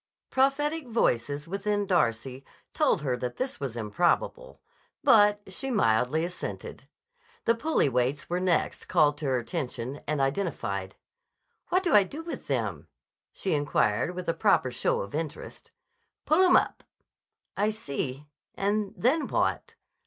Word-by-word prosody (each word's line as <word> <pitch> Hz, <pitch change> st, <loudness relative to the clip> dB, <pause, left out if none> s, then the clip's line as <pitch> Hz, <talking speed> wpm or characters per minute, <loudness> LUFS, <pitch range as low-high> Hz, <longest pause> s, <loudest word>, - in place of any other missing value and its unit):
Prophetic 285 Hz, +3 st, +1 dB
voices 145 Hz, -, 0 dB
within 205 Hz, +2 st, -1 dB
Darcy 130 Hz, -, 0 dB, 0.3 s
told 280 Hz, -, +2 dB
her 130 Hz, -3 st, 0 dB
that 125 Hz, 0 st, -4 dB
this 260 Hz, +1 st, -3 dB
was 130 Hz, -4 st, -4 dB
improbable: 175 Hz, -, 0 dB, 0.4 s
but 210 Hz, -5 st, +5 dB
she 270 Hz, +7 st, -4 dB
mildly 150 Hz, -, +2 dB
assented. 180 Hz, +1 st, -7 dB, 0.6 s
The 230 Hz, -, +5 dB
pulley 280 Hz, -, +1 dB
weights 130 Hz, +3 st, 0 dB
were 175 Hz, +1 st, -1 dB
next 185 Hz, -2 st, 0 dB
called 150 Hz, -1 st, +3 dB
to 155 Hz, -, -5 dB
her 130 Hz, -2 st, +2 dB
attention 125 Hz, +1 st, -4 dB
and 150 Hz, 0 st, 0 dB
identified. 135 Hz, -, -2 dB, 0.7 s
"What 370 Hz, +1 st, +2 dB
do 350 Hz, -, +1 dB
I 205 Hz, -, +8 dB
do 295 Hz, -, -8 dB
with 335 Hz, -, -7 dB
them?" -, -, -2 dB, 0.4 s
she 190 Hz, -, -2 dB
inquired 145 Hz, 0 st, +1 dB
with 180 Hz, 0 st, -6 dB
a 165 Hz, -, +2 dB
proper 165 Hz, -, +2 dB
show 120 Hz, -, 0 dB
of 100 Hz, -, -7 dB
interest. 155 Hz, 0 st, -6 dB, 0.6 s
"Pull 315 Hz, +5 st, +4 dB
'em 360 Hz, -, +5 dB
up." -, -, +2 dB, 0.7 s
"I 205 Hz, +2 st, +1 dB
see. 140 Hz, -8 st, -4 dB, 0.3 s
And 205 Hz, 0 st, -1 dB
then 290 Hz, +7 st, +2 dB
what?" 465 Hz, -, -1 dB
175 Hz, 140 wpm, -28 LUFS, -, 0.7 s, I